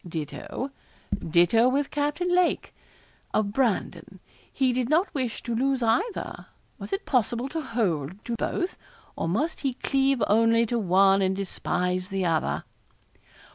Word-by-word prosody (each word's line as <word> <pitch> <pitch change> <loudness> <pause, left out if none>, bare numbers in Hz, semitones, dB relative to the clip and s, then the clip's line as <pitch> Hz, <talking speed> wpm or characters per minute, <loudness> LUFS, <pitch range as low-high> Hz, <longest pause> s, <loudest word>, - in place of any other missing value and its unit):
Ditto, 170 - -5 0.6
ditto 175 +9 +5
with 275 +2 0
Captain 295 +5 0
Lake, 360 -1 +1 0.6
of 205 -2 +1
Brandon. 245 -5 -1 0.3
He 260 -2 +1
did 250 0 -1
not 335 +6 +2
wish 255 -6 -3
to 235 - -3
lose 260 +2 +1
either. 365 - -1 0.3
Was - - -8
it 390 +1 -2
possible 240 0 +1
to 320 +3 -3
hold 190 - -2
to 235 - -2
both, 355 +10 -2 0.4
or 165 - -2
must 290 - -1
he 270 -3 -1
cleave 270 -2 +1
only 230 +2 +4
to 235 +1 -1
one 195 0 +4
and 190 0 +1
despise 185 -1 -2
the 195 -2 -1
other? 165 -2 0
235 Hz, 140 wpm, -26 LUFS, 195-275 Hz, 0.6 s, ditto